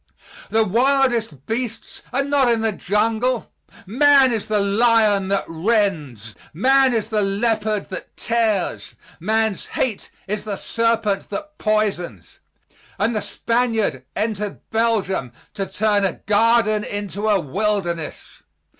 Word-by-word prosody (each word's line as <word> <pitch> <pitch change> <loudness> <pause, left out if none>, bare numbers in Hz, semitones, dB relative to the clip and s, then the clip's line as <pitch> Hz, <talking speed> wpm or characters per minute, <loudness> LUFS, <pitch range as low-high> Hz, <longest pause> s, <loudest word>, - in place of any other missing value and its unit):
The 225 0 +3
wildest 235 - +1
beasts 230 0 -4
are 275 +2 +1
not 280 -2 +2
in 230 -1 +2
the 220 0 +1
jungle; 225 +5 0 0.3
man 270 +5 +5
is 220 -3 -3
the 215 -1 +1
lion 205 -1 +3
that 195 0 0
rends, 160 - -1 0.2
man 265 +5 +4
is 220 0 -2
the 215 -1 +2
leopard 210 +1 0
that 185 - -8
tears, 225 -5 -1 0.2
man's 220 +3 0
hate 230 -6 -1 0.2
is 210 +1 -3
the 210 -2 -3
serpent 230 -2 0
that 300 +10 -7
poisons, 195 - -2 0.6
and 225 +3 0
the 210 - 0
Spaniard 225 - -1
entered 210 -2 -3
Belgium 210 - 0 0.2
to 195 -2 -3
turn 210 -1 +1
a 190 - +1
garden 215 +1 +2
into 205 +1 -3
a 205 -2 +4
wilderness. 175 0 -3
215 Hz, 125 wpm, -21 LUFS, 195-230 Hz, 0.6 s, man